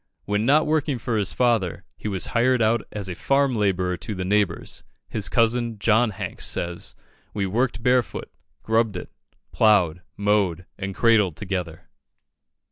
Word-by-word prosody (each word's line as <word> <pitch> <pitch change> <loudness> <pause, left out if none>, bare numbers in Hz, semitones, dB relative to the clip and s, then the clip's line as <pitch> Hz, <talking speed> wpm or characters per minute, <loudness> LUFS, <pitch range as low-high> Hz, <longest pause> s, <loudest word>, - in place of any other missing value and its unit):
When 105 +3 0
not 150 +3 +5
working 150 -3 0
for 115 0 -2
his 105 -3 +1
father, 110 -8 +1
he - - -6
was 95 -5 -1
hired 125 +2 +3
out 115 0 +2
as 105 -2 -5
a 90 - -3
farm 135 +7 +1
labourer 95 -4 0
to 105 +2 -6
the 95 0 -3
neighbours. 100 -3 -1 0.3
His 100 -4 -2
cousin, 115 0 +1
John 110 +3 +3
Hanks, 105 - -4
says 85 0 -4 0.4
"We 100 -2 0
worked 115 +3 -1
barefoot, 125 -1 +1 0.3
grubbed 110 -3 +1
it, - - -8 0.4
ploughed, 90 -6 +3 0.2
mowed, 100 -4 +1
and 100 -1 -5
cradled 105 -8 +3
together." 90 -4 -4
105 Hz, 150 wpm, -24 LUFS, 95-115 Hz, 0.4 s, not